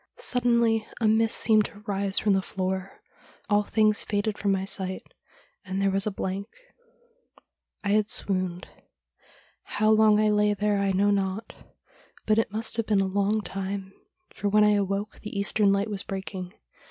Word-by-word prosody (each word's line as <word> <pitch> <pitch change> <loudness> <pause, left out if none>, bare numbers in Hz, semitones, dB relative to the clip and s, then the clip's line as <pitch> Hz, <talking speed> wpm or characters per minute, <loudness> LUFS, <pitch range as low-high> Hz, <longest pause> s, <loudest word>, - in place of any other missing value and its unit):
Suddenly 235 -3 +1
a 225 - +2
mist 220 +1 +2
seemed 215 -2 +3
to 205 - -9
rise 200 -1 +1
from 210 -2 +3
the 190 - +2
floor; 190 0 -4 0.5
all 205 0 +4
things 215 0 +2
faded 205 0 -1
from 200 -1 -1
my 190 0 0
sight, 190 -1 -3 0.6
and 190 -1 -4
there 195 0 +2
was 195 +1 0
a - - 0
blank 195 +1 -4 0.7
— - - -35
I 200 - -2
had 210 +1 +2
swooned. 185 -4 -1 0.9
How 215 +1 0
long 215 -1 +5
I 215 0 +3
lay 210 0 +2
there 205 0 0
I 200 0 +1
know 200 +2 +2
not; 195 +2 -2 0.7
but 215 0 +3
it 225 - -1
must 220 +2 0
have 230 - -1
been 210 -2 +2
a - - +1
long 200 +3 0
time, 195 -1 -5 0.4
for 205 - -2
when 210 +1 +4
I 210 - +5
awoke 200 +1 -2
the 210 -1 -7
eastern 200 0 +2
light 200 +2 0
was 200 -1 -3
breaking. 190 -1 -6
205 Hz, 175 wpm, -26 LUFS, 195-215 Hz, 0.9 s, long